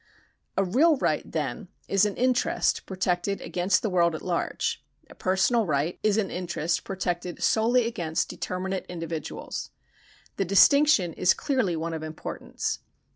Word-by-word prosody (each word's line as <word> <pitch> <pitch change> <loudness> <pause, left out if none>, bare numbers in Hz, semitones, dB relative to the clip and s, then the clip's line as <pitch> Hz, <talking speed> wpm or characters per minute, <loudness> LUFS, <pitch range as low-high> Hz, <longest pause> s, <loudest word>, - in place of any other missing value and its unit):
A 195 - +4
real 285 - +4
right, - - +1
then, - - -3 0.2
is 195 +1 +3
an 205 - -5
interest 255 0 +1
protected 185 +1 -1
against 185 +2 0
the 220 - +1
world 170 -2 +3
at - - -7
large; 175 -2 -2 0.3
a - - -10
personal 190 +4 +1
right 150 +3 0
is 215 -1 +2
an 205 -4 0
interest 175 -2 -2
protected 180 -2 -3
solely 235 +2 +3
against 170 -9 -1
determinate 185 +1 -4
individuals. 165 -3 -5 0.7
The 195 - +1
distinction 200 - +5
is 180 - +3
clearly 255 -11 0
one 165 +1 -3
of 160 - -4
importance. 155 0 -4
185 Hz, 140 wpm, -26 LUFS, 170-215 Hz, 0.7 s, distinction